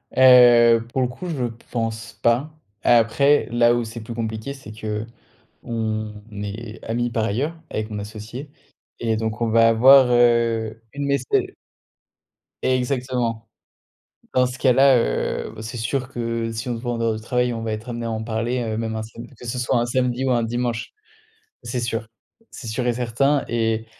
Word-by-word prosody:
Heu, 120 Hz, -3 st, +7 dB
pour 130 Hz, -, +1 dB
le 125 Hz, -, +2 dB
coup, 130 Hz, +9 st, -8 dB
je 135 Hz, -7 st, -2 dB, 0.3 s
pense 115 Hz, -1 st, -3 dB
pas. 120 Hz, +6 st, +1 dB, 0.3 s
Après, 120 Hz, +6 st, +4 dB
là 120 Hz, 0 st, +4 dB
où 120 Hz, -, 0 dB
c'est 110 Hz, +1 st, -7 dB
plus 115 Hz, +2 st, -7 dB
compliqué, 110 Hz, +3 st, -4 dB
c'est 130 Hz, -6 st, -11 dB, 0.7 s
qu'on 110 Hz, -2 st, -4 dB, 0.2 s
est 105 Hz, +2 st, -7 dB
amis, 120 Hz, +2 st, -1 dB
par 115 Hz, -1 st, -1 dB
ailleurs, 135 Hz, +10 st, -1 dB
avec 110 Hz, +1 st, -3 dB
mon 105 Hz, -1 st, -4 dB
associé 110 Hz, +7 st, -8 dB, 0.5 s
et 115 Hz, -1 st, +1 dB
donc 110 Hz, 0 st, -3 dB
on 115 Hz, -, +1 dB
va 115 Hz, 0 st, +5 dB
avoir, 130 Hz, +3 st, +7 dB
heu, 115 Hz, -2 st, +2 dB
une 140 Hz, 0 st, -3 dB
mais 140 Hz, 0 st, +2 dB
c'est -, -, +1 dB, 1.1 s
exactement. 125 Hz, -3 st, -1 dB, 0.9 s
Dans 125 Hz, 0 st, +4 dB
ce 125 Hz, +1 st, -6 dB
cas-là, 130 Hz, 0 st, +5 dB
heu, -, -, -1 dB
v 110 Hz, -, -7 dB
c'est 110 Hz, +2 st, -6 dB
sûr 130 Hz, +4 st, -2 dB
que, 115 Hz, -2 st, -3 dB
si 115 Hz, +3 st, -5 dB
on 120 Hz, -, -1 dB
se 115 Hz, -, -9 dB
voit 120 Hz, -1 st, -2 dB
en 115 Hz, -, -3 dB
dehors 115 Hz, -1 st, +1 dB
du 110 Hz, -, -6 dB
travail, 125 Hz, +1 st, 0 dB
on 115 Hz, -1 st, -4 dB
va 110 Hz, -1 st, -2 dB
être 110 Hz, +3 st, -6 dB
amenés 120 Hz, -1 st, -4 dB
à -, -, -2 dB
en 110 Hz, 0 st, -3 dB
parler, 115 Hz, +2 st, -1 dB
heu, 110 Hz, -1 st, -3 dB
même 110 Hz, -1 st, -3 dB
un 110 Hz, -, -3 dB
samed 115 Hz, +3 st, -10 dB
que 120 Hz, -, -10 dB
ce 125 Hz, +2 st, -3 dB
soit 120 Hz, 0 st, +1 dB
un 120 Hz, -, 0 dB
samedi 125 Hz, +1 st, 0 dB
ou 130 Hz, -, +1 dB
un 120 Hz, -1 st, +2 dB
dimanche. 120 Hz, 0 st, -2 dB, 0.7 s
C'est 125 Hz, -, -3 dB
sûr. 115 Hz, -2 st, -3 dB, 0.4 s
C'est 120 Hz, -, -10 dB
sûr 120 Hz, +3 st, -2 dB
et 120 Hz, -, +2 dB
certain. 130 Hz, +4 st, +1 dB
Et 115 Hz, -1 st, 0 dB
115 Hz, 185 wpm, -22 LUFS, 110-125 Hz, 1.1 s, Heu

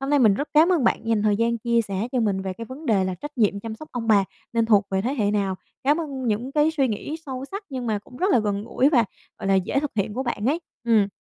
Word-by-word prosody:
hôm 270 Hz, +1 st, -3 dB
nay 290 Hz, -, +4 dB
mình 220 Hz, -6 st, +5 dB
rất 285 Hz, +8 st, -3 dB
cám 310 Hz, +3 st, +6 dB
ơn 320 Hz, -8 st, +2 dB
bạn 230 Hz, -, +1 dB
dành 225 Hz, -2 st, +2 dB
thời 210 Hz, -1 st, +3 dB
gian 230 Hz, +1 st, +1 dB
chia 235 Hz, +1 st, +2 dB
sẻ 200 Hz, +2 st, -3 dB
cho 250 Hz, -, +1 dB
mình 200 Hz, -4 st, +1 dB
về 190 Hz, -1 st, -3 dB
cái 230 Hz, +5 st, -7 dB
vấn 265 Hz, +7 st, -9 dB
đề 200 Hz, -6 st, +3 dB
là 185 Hz, 0 st, -2 dB
trách 295 Hz, +7 st, -9 dB
nhiệm 200 Hz, -3 st, +2 dB
chăm 225 Hz, +1 st, -5 dB
sóc 305 Hz, +7 st, -11 dB
ông 240 Hz, -2 st, -3 dB
bà 205 Hz, -3 st, +5 dB, 0.3 s
nên 230 Hz, -1 st, +2 dB
thuộc 205 Hz, -3 st, +4 dB
về 190 Hz, 0 st, +1 dB
thế 255 Hz, +6 st, -1 dB
hệ 210 Hz, -7 st, +1 dB
nào? 200 Hz, -2 st, 0 dB, 0.3 s
Cảm 295 Hz, +4 st, +3 dB
ơn 275 Hz, -5 st, -4 dB
những 230 Hz, +5 st, -1 dB
cái 300 Hz, +1 st, +3 dB
suy 280 Hz, -5 st, +1 dB
nghĩ 235 Hz, +8 st, -4 dB
sâu 260 Hz, -1 st, -5 dB
sắc, 400 Hz, +2 st, -5 dB
nhưng 255 Hz, -3 st, -4 dB
mà 215 Hz, -2 st, 0 dB
cũng 230 Hz, +4 st, -15 dB
rất 370 Hz, +8 st, +1 dB
là -, -, +5 dB
gần 205 Hz, -2 st, -1 dB
gũi 255 Hz, +3 st, +2 dB
và, 250 Hz, -7 st, +4 dB, 0.3 s
gọi -, -, -5 dB
là, 195 Hz, -, +4 dB
dễ 190 Hz, +8 st, +1 dB
thực 295 Hz, -1 st, -3 dB
hiện 205 Hz, 0 st, -1 dB
của 260 Hz, -, -1 dB
bạn 235 Hz, -4 st, -2 dB
ấy, 315 Hz, +5 st, +1 dB, 0.2 s
ừm. 225 Hz, -4 st, +4 dB
230 Hz, 300 wpm, -24 LUFS, 205-275 Hz, 0.3 s, cám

